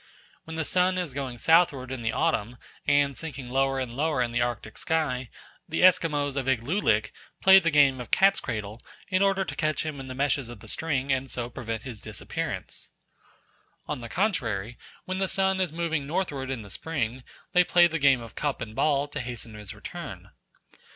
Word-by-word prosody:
When 160 Hz, -, -7 dB
the 160 Hz, -1 st, -1 dB
sun 185 Hz, +4 st, +2 dB
is 175 Hz, -7 st, -2 dB
going 130 Hz, -3 st, -4 dB
southward 155 Hz, -3 st, +3 dB
in 130 Hz, -2 st, -4 dB
the 115 Hz, 0 st, 0 dB
autumn, 125 Hz, -8 st, 0 dB, 0.3 s
and 145 Hz, -1 st, +3 dB
sinking 135 Hz, -5 st, -6 dB
lower 135 Hz, +1 st, +2 dB
and 125 Hz, -3 st, -3 dB
lower 150 Hz, 0 st, 0 dB
in 120 Hz, -, -3 dB
the 120 Hz, -, 0 dB
Arctic 120 Hz, -2 st, -3 dB
sky, 135 Hz, -6 st, -1 dB, 0.4 s
the 160 Hz, -, 0 dB
Esquimaux 150 Hz, -6 st, +4 dB
of 135 Hz, -1 st, -1 dB
Iglulik 120 Hz, -, +1 dB, 0.3 s
play 190 Hz, 0 st, +8 dB
the 170 Hz, -3 st, +1 dB
game 140 Hz, -4 st, +4 dB
of 120 Hz, -, -8 dB
cat's 195 Hz, +2 st, +5 dB
cradle 110 Hz, -, -5 dB, 0.3 s
in 185 Hz, -1 st, +2 dB
order 195 Hz, -1 st, +3 dB
to -, -, -5 dB
catch 155 Hz, 0 st, 0 dB
him 155 Hz, -3 st, -4 dB
in 135 Hz, -, -7 dB
the 130 Hz, -, -6 dB
meshes 140 Hz, -2 st, 0 dB
of 120 Hz, -3 st, -9 dB
the -, -, -13 dB
string 140 Hz, -4 st, 0 dB
and 130 Hz, 0 st, -2 dB
so 120 Hz, 0 st, -3 dB
prevent 115 Hz, -3 st, -5 dB
his 120 Hz, -6 st, -8 dB
disappearance. -, -, -4 dB, 1.0 s
On 150 Hz, -4 st, -4 dB
the 115 Hz, -, -7 dB
contrary, 120 Hz, -, -1 dB, 0.3 s
when 185 Hz, 0 st, -3 dB
the 190 Hz, -, +1 dB
sun 190 Hz, 0 st, +2 dB
is 180 Hz, -4 st, 0 dB
moving 160 Hz, -3 st, -2 dB
northward 145 Hz, -5 st, -2 dB
in 130 Hz, -5 st, -3 dB
the 100 Hz, -, -10 dB
spring, 130 Hz, -6 st, -3 dB, 0.3 s
they 180 Hz, -, +6 dB
play 175 Hz, 0 st, +5 dB
the 165 Hz, -1 st, 0 dB
game 135 Hz, -3 st, +4 dB
of 115 Hz, -, -10 dB
cup 145 Hz, -2 st, -2 dB
and 110 Hz, -2 st, -6 dB
ball 145 Hz, 0 st, +2 dB
to 145 Hz, 0 st, -5 dB
hasten 120 Hz, -3 st, -5 dB
his 105 Hz, -3 st, -7 dB
return. -, -, -8 dB
140 Hz, 195 wpm, -27 LUFS, 120-165 Hz, 1.0 s, play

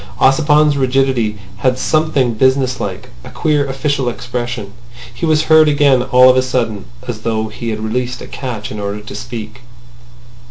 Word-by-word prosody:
Ossipon's 150 Hz, +1 st, +4 dB
rigidity 130 Hz, -5 st, +1 dB, 0.2 s
had 125 Hz, +2 st, +1 dB
something 140 Hz, -4 st, +1 dB
business 130 Hz, +2 st, +1 dB
like, -, -, -5 dB
a -, -, -10 dB
queer 150 Hz, -2 st, 0 dB
official 135 Hz, -1 st, -1 dB
expression. 120 Hz, -3 st, -5 dB, 0.4 s
He 140 Hz, +7 st, -3 dB
was 155 Hz, -1 st, +3 dB
heard 155 Hz, -1 st, +5 dB
again 140 Hz, -3 st, +3 dB
all 125 Hz, 0 st, +5 dB
of 130 Hz, -, +6 dB
a -, -, +5 dB
sudden, 115 Hz, -6 st, -2 dB, 0.2 s
as 120 Hz, -3 st, -4 dB
though 110 Hz, -1 st, -2 dB
he 115 Hz, +2 st, -6 dB
had 110 Hz, -1 st, -3 dB
released 125 Hz, +3 st, -2 dB
a -, -, -8 dB
catch 120 Hz, -6 st, -6 dB
in 105 Hz, -, -6 dB
order 100 Hz, +1 st, -4 dB
to 105 Hz, -, -10 dB
speak. 120 Hz, -1 st, -7 dB
125 Hz, 165 wpm, -16 LUFS, 115-135 Hz, 0.4 s, of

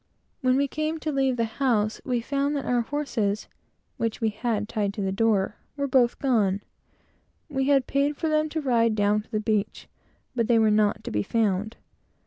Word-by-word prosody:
When 255 Hz, -1 st, +3 dB
we 280 Hz, 0 st, +2 dB
came 310 Hz, +3 st, -2 dB
to 310 Hz, -, -2 dB
leave 270 Hz, -2 st, +1 dB
the 230 Hz, -, +1 dB
house, 225 Hz, -2 st, 0 dB
we 245 Hz, -2 st, -1 dB
found 280 Hz, +3 st, -1 dB
that 280 Hz, -, -3 dB
our 245 Hz, -1 st, +2 dB
horses, 230 Hz, -6 st, -2 dB, 0.5 s
which 230 Hz, -1 st, -2 dB
we 220 Hz, -3 st, -1 dB
left 215 Hz, -3 st, 0 dB
tied 205 Hz, -1 st, -2 dB
at 200 Hz, -, -1 dB
the 190 Hz, -, 0 dB
door, 210 Hz, 0 st, +1 dB, 0.2 s
were 280 Hz, -, 0 dB
both 255 Hz, -3 st, +3 dB
gone. 205 Hz, -7 st, +1 dB, 0.9 s
We 270 Hz, -2 st, -1 dB
had 275 Hz, -3 st, +4 dB
paid 285 Hz, +1 st, 0 dB
for 325 Hz, -, -1 dB
them 310 Hz, 0 st, +1 dB
to 315 Hz, +1 st, -2 dB
ride 230 Hz, -5 st, +2 dB
down 205 Hz, 0 st, +2 dB
to 210 Hz, -, -22 dB
the 215 Hz, -2 st, -1 dB
beach, 215 Hz, -1 st, -1 dB, 0.5 s
but 230 Hz, -3 st, +1 dB
they 235 Hz, -, +4 dB
were 220 Hz, -1 st, +4 dB
not 210 Hz, 0 st, +2 dB
to -, -, -5 dB
be 105 Hz, -, 0 dB
found. 215 Hz, -, 0 dB
230 Hz, 195 wpm, -26 LUFS, 210-275 Hz, 0.9 s, had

